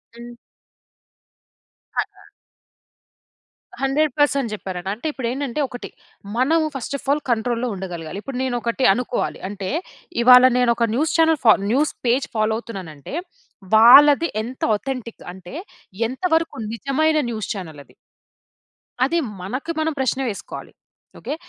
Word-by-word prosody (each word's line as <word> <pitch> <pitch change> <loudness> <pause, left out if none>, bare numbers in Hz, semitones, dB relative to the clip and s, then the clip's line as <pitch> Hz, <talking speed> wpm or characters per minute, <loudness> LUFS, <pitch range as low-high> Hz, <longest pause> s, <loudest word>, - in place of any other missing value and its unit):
హ్మ్. 240 0 -11 1.6
కదా! - - -4 1.5
100% 280 -2 +1
జెప్పారండి. 190 -3 -5
అంటే 235 +9 -5
ఇప్పుడేంటంటే 260 +1 -3
ఒకటి 245 -1 -8 0.5
మనం 300 +6 +3 0.2
ఫస్ట్ 270 +1 -4
ఆఫ్ 275 - -15
ఆల్ 295 - +1
కంట్రోల్‌లో 235 +1 0
ఉండగలగాలి. 180 -2 -6
ఇప్పుడు 270 -2 -5
నేను 255 -2 -1
ఒకటి 235 +3 0
అనుకోవాలి. 250 +2 -2
అంటే 200 -2 -5 0.5
ఇవాళ 250 +1 +9
నేనొక 235 -2 +2
న్యూస్ 305 +4 0
చానల్ 320 -2 +4
ఫా 220 - +9 0.2
న్యూస్ 290 +5 +2
పేజ్ 250 +3 +2
ఫాలో 215 0 +1
అవుతున్నానంటే 190 - -8 0.6
వాళ్ళది 285 +8 +8 0.2
ఎంత 250 +3 -9
ఆథెంటిక్ 250 0 -6
అంటే 185 +2 -12 0.5
ఎంత 260 +9 -9
వరకు 325 0 0 0.2
నిజమైన 305 +6 +1
న్యూస్ 215 -3 -4
చానలది? 160 -8 -9 1.1
అది 335 +6 0 0.2
మనకు 255 - -4
మనం 315 0 0
ప్రశ్న 265 0 0
వేసుకోవాలి. 200 - -8 0.5
ఓకె. 300 - -4
245 Hz, 115 wpm, -21 LUFS, 215-280 Hz, 1.6 s, ఇవాళ